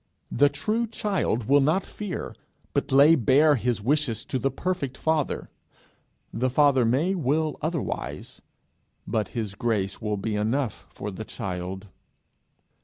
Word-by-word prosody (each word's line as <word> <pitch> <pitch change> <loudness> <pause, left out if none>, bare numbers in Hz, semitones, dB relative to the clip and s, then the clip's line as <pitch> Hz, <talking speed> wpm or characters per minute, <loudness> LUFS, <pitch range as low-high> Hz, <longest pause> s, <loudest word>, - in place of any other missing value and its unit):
The 145 0 +4
true 215 +11 -1
child 195 - -1
will 140 +6 +4
not 155 +8 +2
fear, 205 -4 -5 0.4
but - - -1
lay 140 +4 +7
bare 150 +2 +5
his 120 -4 -1
wishes 130 -4 +1
to 130 - -2
the 135 - +1
perfect 140 -2 -3
Father. 160 -3 -1 0.8
The 130 +3 0
Father 135 -2 +4
may 140 +11 +2
will 155 -2 0
otherwise, 160 -2 -4 0.6
but 110 -2 -1
his 105 -4 -2
grace 100 -3 -1
will 105 -1 -1
be 105 +2 -2
enough 115 +4 -1
for 105 +1 -6
the 105 +3 -6
child. 95 -1 -5
135 Hz, 135 wpm, -26 LUFS, 110-155 Hz, 0.8 s, lay